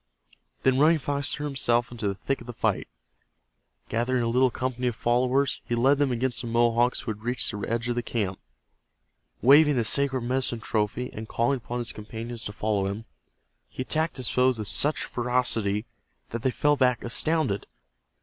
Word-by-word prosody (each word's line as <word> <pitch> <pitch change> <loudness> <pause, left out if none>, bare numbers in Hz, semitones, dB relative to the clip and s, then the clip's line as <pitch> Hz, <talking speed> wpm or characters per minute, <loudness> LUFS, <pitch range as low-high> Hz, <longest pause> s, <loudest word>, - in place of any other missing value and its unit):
Then 130 0 +3
Running 160 +3 +5
Fox 140 -2 -1
threw 150 - -3
himself 120 -4 +2
into 115 -4 -3
the 100 - -1
thick 135 +7 -3
of 120 - -12
the 120 - -6
fight. - - -1 1.0
Gathering 120 +2 0
a - - 0
little 125 +2 +3
company 125 0 -2
of 120 - -1
followers, 125 +4 +1
he 120 - -2
led 135 +4 +3
them 145 -2 +2
against 125 +1 -1
the 120 - -6
Mohawks 120 +1 +2
who 110 - -3
had 105 0 -8
reached 120 +3 -1
the 105 - -6
edge 115 +1 -1
of 120 - 0
the 120 - -1
camp. 100 -6 -3 1.0
Waving 145 +3 +7
the 120 - +2
sacred 135 +2 +2
medicine 125 -1 -1
trophy, 110 +3 -2
and 110 +1 -7
calling 120 +4 +1
upon 120 0 -6
his 120 -2 -4
companions 115 +2 -7
to - - -3
follow 105 -2 -1
him, 105 +3 -5 0.6
he 130 - -5
attacked 160 +4 -1
his 130 -3 0
foes 125 -1 +3
with 105 -2 -4
such 150 +2 +1
ferocity 120 -4 0 0.5
that 115 - -4
they 130 - +1
fell 145 +3 +2
back 125 -3 +2
astounded. 130 -3 0
120 Hz, 185 wpm, -26 LUFS, 115-130 Hz, 1.0 s, Waving